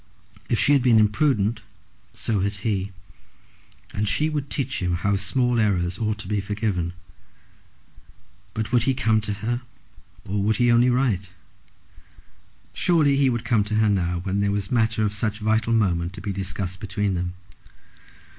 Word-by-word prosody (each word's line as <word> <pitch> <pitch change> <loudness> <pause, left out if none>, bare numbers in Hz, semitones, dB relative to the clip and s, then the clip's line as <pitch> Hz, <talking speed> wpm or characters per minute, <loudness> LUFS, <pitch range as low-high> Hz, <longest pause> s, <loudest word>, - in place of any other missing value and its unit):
If 115 - +2
she 145 - +4
had 140 - +4
been 120 -3 +5
imprudent, 110 0 +2 0.5
so 110 -3 -1
had 100 +2 -1
he; 100 -3 -1 1.0
and 105 -1 -1
she 150 +10 +1
would 145 -2 -3
teach 135 -5 -2
him 90 -1 0
how 100 +3 0
small 120 +5 +1
errors 90 -4 0
ought 110 -1 -1
to - - -9
be 105 0 0
forgiven. 100 -4 -2 1.6
But 110 0 -3
would 120 -1 +4
he 135 - +2
come 110 -3 +2
to 105 0 -3
her, 115 +4 -2 0.7
or 100 +1 -1
would 105 +1 +1
he 120 -1 +4
only 120 +2 +5
write? 120 -7 +1 1.4
Surely 155 -5 +3
he 135 -1 +3
would 120 -2 -2
come 110 -4 +2
to 105 +1 -2
her 110 -1 +3
now 90 -3 0
when 100 +1 -1
there 100 0 +1
was 100 -1 -3
matter 110 -2 +2
of 105 - -1
such 105 0 -1
vital 110 +1 0
moment 90 -6 +1
to 100 - -9
be 100 0 -3
discussed 95 -1 -4
between 100 0 -1
them! 90 0 -3
105 Hz, 165 wpm, -24 LUFS, 100-120 Hz, 1.6 s, been